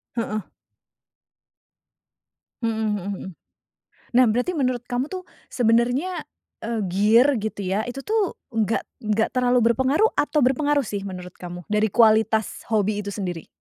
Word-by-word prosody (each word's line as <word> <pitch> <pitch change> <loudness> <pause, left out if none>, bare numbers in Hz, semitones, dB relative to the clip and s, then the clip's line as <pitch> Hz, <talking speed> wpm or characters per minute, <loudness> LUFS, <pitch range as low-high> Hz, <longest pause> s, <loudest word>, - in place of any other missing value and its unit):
Heeh. 215 -2 -2 2.2
Mhm 225 -1 0
mhm 190 - -5 0.2
mhm. - - -8 0.9
Nah 255 - +7
berarti 250 +10 0
menurut 255 -4 0
kamu 250 +4 -2
tuh 370 -1 -5 0.3
sebenernya, 245 +9 +1 0.4
eee, 230 -1 -2
gear 220 +9 +4
gitu 220 -2 -4
ya, 195 +4 0
itu 245 +3 -6
tuh 420 +5 -1 0.2
enggak 225 0 0 0.2
enggak 215 +1 +1
terlalu 250 0 +3
berpengaruh 275 - +2
atau 300 +1 +1
berpengaruh 285 +1 +2
sih, 200 -1 -4
menurut 180 -2 -7
kamu, 175 -1 -9
dari 210 0 +1
kualitas 220 -1 +3
hobi 210 -1 +1
itu 200 - -5
sendiri? 180 -5 -5
230 Hz, 130 wpm, -23 LUFS, 210-260 Hz, 2.2 s, Nah